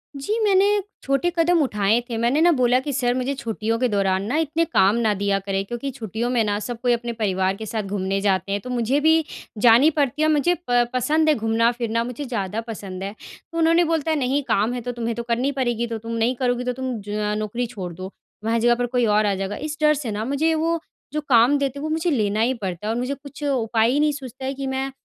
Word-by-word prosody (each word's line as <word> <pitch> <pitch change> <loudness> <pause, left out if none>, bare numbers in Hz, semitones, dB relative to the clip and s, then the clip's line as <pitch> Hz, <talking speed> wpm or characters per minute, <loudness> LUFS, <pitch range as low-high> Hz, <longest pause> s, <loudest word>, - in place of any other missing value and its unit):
जी, 345 +12 -2
मैंने 395 -1 +4 0.4
छोटे 275 +6 +1
कदम 335 0 +3
उठाए 210 -3 +2
थे, 230 - -3
मैंने 245 +7 +2
ना 345 - +6
बोला 250 0 +4
कि, 285 +2 -4
"सर 245 -2 +1
मुझे 255 +2 -1
छुट्टियों 225 -2 -2
के 255 - +2
दौरान 195 -1 +1
ना 245 +8 -2
इतने 320 +2 0
काम 200 -8 +3
ना 215 - +3
दिया 200 -1 +1
करें 195 0 0
क्योंकि 240 +6 -4
छुट्टियों 230 -1 -4
में 230 - +3
ना 205 -1 0
सब 240 -1 -5
कोई 245 -1 +3
अपने 235 0 -3
परिवार 190 -4 0
के 220 - -7
साथ 220 0 -3
घूमने 195 0 -1
जाते 195 -1 0
हैं, 200 0 -1
तो 250 - -8
मुझे 250 +3 +1
भी 320 0 +4 0.4
जानी 240 +6 +7
पड़ती 285 0 +1
है, 310 - +4
मुझे 330 +4 +2
प 245 0 +4
पसंद 310 +5 +2
है 300 - +4
घूमना-फिरना 230 +1 +1
मुझे 250 +4 -5
ज़्यादा 220 -3 -3
पसंद 195 -4 -6
है।" 200 +1 -4 0.4
तो 330 - -6
उन्होंने 330 +1 +4
बोलता 320 0 0
है, 310 - +1
"नहीं, 270 +2 +1
काम 225 -1 +1
है 245 - -4
तो 245 +1 -4
तुम्हें 235 -1 -3
तो 235 - -4
करनी 240 +4 0
पड़ेगी 235 -2 0
तो 230 - -4
तुम 230 +1 -8
नहीं 250 +2 +1
करोगी 245 -1 0
तो 250 0 -1
तुम 255 -4 -3
ज 210 0 -2
नौकरी 215 +3 -2
छोड़ 180 -4 -5
दो, 185 +3 -7
तुम्हारे 225 +3 -4
जगह 240 0 +4
पर 245 +1 -1
कोई 245 -2 +3
और 210 0 +3
आ 200 -1 +1
जाएगा।" 195 +2 -3
इस 305 - -5
डर 300 0 +5
से 225 - -3
ना 210 +2 -3
मुझे 285 +5 +1
वो 330 +1 0 0.3
जो 305 - -1
काम 245 +4 +5
देते 280 0 -2
हैं, - - -6
वो 310 - -2
मुझे 320 +2 0
लेना 215 -5 0
ही 245 +3 +2
पड़ता 195 -4 -5
है 225 - 0
और 240 - -2
मुझे 250 +3 -2
कुछ 280 +1 -11
उपाय 230 -5 +1
ही 285 - +1
नहीं 300 0 +3
सूझता 265 -2 -8
है 270 - -2
कि 275 0 -5
मैं 265 +1 -2
240 Hz, 250 wpm, -22 LUFS, 215-280 Hz, 0.4 s, जानी